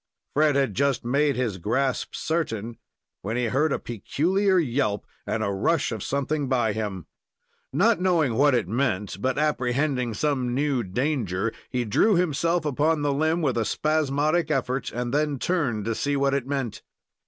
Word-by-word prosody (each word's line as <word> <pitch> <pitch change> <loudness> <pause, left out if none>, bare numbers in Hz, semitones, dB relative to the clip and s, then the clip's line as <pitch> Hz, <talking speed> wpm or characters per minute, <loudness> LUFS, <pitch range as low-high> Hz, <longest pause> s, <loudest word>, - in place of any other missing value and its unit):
Fred 150 -1 +3
had 135 -6 +1
just 135 +1 0
made 140 +3 +2
his 115 -6 -2
grasp 130 +8 -1
certain, 120 -9 -2 0.4
when 110 +5 -3
he 125 - 0
heard 145 +6 +1
a - - +1
peculiar 185 - 0
yelp, 125 - 0 0.2
and 110 - -1
a 100 - 0
rush 95 0 +1
of - - -4
something 140 0 -1
by 120 -5 +1
him. 100 -5 -4 0.7
Not 215 +1 +3
knowing 170 -9 +2
what 140 +3 +4
it 115 -7 0
meant, 105 -4 -1
but 130 +1 0
apprehending 130 -4 0
some 130 -2 0
new 140 -2 +1
danger, 115 - -1 0.2
he 125 -2 -1
drew 200 - +3
himself 170 0 +1
upon 150 +2 +1
the 145 -1 +1
limb 160 +4 +1
with 130 -5 +1
a - - +2
spasmodic 155 +4 +1
effort, 135 -2 -1
and 120 +1 -3
then 150 -1 +1
turned 130 - -1
to 115 - 0
see 145 +5 -1
what 140 0 +1
it 140 -2 -1
meant. 135 -5 -3
135 Hz, 165 wpm, -25 LUFS, 115-150 Hz, 0.7 s, what